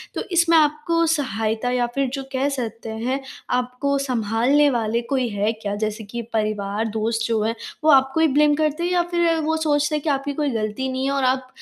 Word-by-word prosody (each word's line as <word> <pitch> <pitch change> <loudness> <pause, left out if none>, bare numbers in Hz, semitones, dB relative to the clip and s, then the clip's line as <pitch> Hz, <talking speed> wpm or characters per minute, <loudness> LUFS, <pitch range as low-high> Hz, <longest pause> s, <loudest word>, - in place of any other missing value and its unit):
तो - - -2
इसमें 335 -1 +4
आपको 310 +2 +2
सहायता 225 -4 -2
या 245 -1 +1
फ़िर 275 -1 +1
जो 275 -1 -3
कह 265 +1 +1
सकते 230 -1 -5
हैं, 235 +5 -2 0.3
आपको 250 +3 0
सँभालने 255 +2 +2
वाले 230 -2 0
कोई 260 -3 +1
है 205 +1 0
क्या? 210 -2 -4
जैसे 215 +1 -3
कि 235 +3 -6
परिवार, 215 -1 -1
दोस्त 225 +1 -1
जो 225 -2 0
हैं 225 +1 -1 0.3
वो 310 - +4
आपको 270 +2 +4
ही 320 - +5
ब्लेम 295 +1 +3
करते 305 -1 +1
हैं? - - -5
या 355 -1 +3
फ़िर 340 -1 +2
वो 320 +1 +1
सोचते 300 -1 +1
हैं 300 - -1
कि 315 - -1
आपकी 280 0 -1
कोई 295 0 -1
गलती 220 +3 -2
नहीं 260 +1 -2
है 275 - 0
और 275 -1 0
आप 260 0 +1
260 Hz, 210 wpm, -22 LUFS, 225-295 Hz, 0.3 s, ही